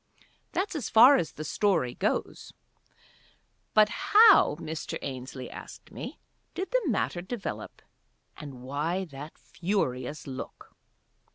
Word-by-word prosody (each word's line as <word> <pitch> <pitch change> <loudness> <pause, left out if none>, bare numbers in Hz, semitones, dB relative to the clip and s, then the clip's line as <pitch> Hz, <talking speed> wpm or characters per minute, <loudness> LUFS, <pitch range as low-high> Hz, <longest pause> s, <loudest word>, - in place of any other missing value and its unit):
That's 380 -1 -2
as 300 - -3
far 250 +6 +8
as 165 - -2
the 155 - -6
story 155 -6 +1
goes. - - -2 1.2
But 215 -1 +6
how, 415 - +6
Mr. 160 0 -5
Ainslie 130 -1 -6
asked - - -11
me, - - -7 0.4
did 375 +2 -4
the - - +2
matter 200 -7 -1
develop, 200 +3 -6 0.5
and 135 -4 -10
why 155 +8 -2
that 145 -1 -10
furious 150 -7 -3
look? 130 -2 -9
165 Hz, 115 wpm, -28 LUFS, 135-220 Hz, 1.2 s, far